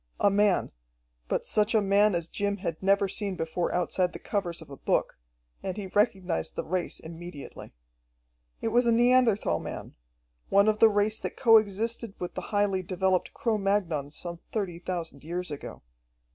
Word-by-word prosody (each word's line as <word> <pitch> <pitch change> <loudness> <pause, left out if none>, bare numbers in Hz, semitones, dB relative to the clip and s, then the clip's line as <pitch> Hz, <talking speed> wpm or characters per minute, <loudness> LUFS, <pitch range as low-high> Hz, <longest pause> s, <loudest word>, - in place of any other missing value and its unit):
A 200 - +4
man 205 -1 +2 0.6
but - - -1
such 210 +2 +1
a - - +6
man 200 0 +3
as 170 -1 -2
Jim 200 +3 -2
had 170 -5 -4
never 195 +1 +3
seen 200 0 -2
before 165 +1 -2
outside 180 0 0
the - - -6
covers 180 -5 -3
of 160 -3 -11
a - - -7
book. - - 0 0.4
And 190 +1 -4
he 205 - -4
recognised 190 -3 0
the - - -3
race 180 0 -2
immediately. 165 - -10 0.9
It 225 - 0
was 240 +2 +3
a - - +5
Neanderthal 235 - +3
man, - - -7 0.6
one 200 +1 +5
of 215 0 +2
the 225 - +8
race 210 +1 +1
that - - -5
co 225 -3 +7
existed 215 +1 -1
with 180 - -5
the - - -4
highly 205 -2 +1
developed 185 0 0
Cro 230 -6 0
Magnons 175 -8 0
some 170 -1 -4
thirty 190 -6 -3
thousand 170 -6 -5
years 175 +1 -4
ago. 145 - -8
195 Hz, 175 wpm, -28 LUFS, 175-210 Hz, 0.9 s, the